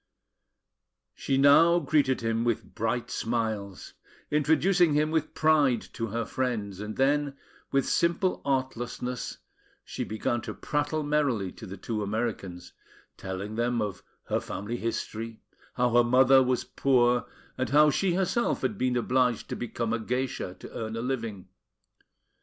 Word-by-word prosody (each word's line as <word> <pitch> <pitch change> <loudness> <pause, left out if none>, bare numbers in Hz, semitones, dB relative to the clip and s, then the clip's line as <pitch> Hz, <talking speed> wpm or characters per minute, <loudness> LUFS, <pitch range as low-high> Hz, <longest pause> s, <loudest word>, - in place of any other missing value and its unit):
She 135 - -1
now 145 +5 +6
greeted 145 -7 +2
him 115 0 0
with 120 -2 -2
bright 115 +2 -2
smiles, 110 -4 -3 0.4
introducing 160 +3 +3
him 155 +1 +2
with 160 -1 -1
pride 150 -6 +3
to 115 - -3
her 115 +2 -2
friends; 110 -8 -2
and 105 +1 -5
then, 140 +1 +1 0.3
with 135 -1 +2
simple 175 +2 +1
artlessness, 125 -2 -3 0.5
she - - -4
began 110 +2 -2
to - - -6
prattle 150 +1 -1
merrily 140 -10 0
to 110 - -11
the 95 +2 -8
two 110 +3 -3
Americans, 100 -5 -4 0.4
telling 95 +3 -5
them 120 +1 0
of 105 -3 -3 0.2
her - - -1
family 110 +5 -5
history, 115 -1 -4 0.4
how 125 -1 +2
her 120 +1 +5
mother 130 +2 +6
was 125 -1 +1
poor, 125 -2 +2 0.3
and 130 - -2
how 150 +1 +6
she 180 +4 +1
herself 190 - 0
had 110 -6 -1
been 125 -1 +1
obliged 125 -1 +1
to - - -3
become 115 -1 -3
a 115 - 0
geisha 125 -4 -3
to - - -10
earn 110 0 -4
a 115 - -3
living. 115 -7 -4
125 Hz, 145 wpm, -28 LUFS, 110-140 Hz, 0.5 s, now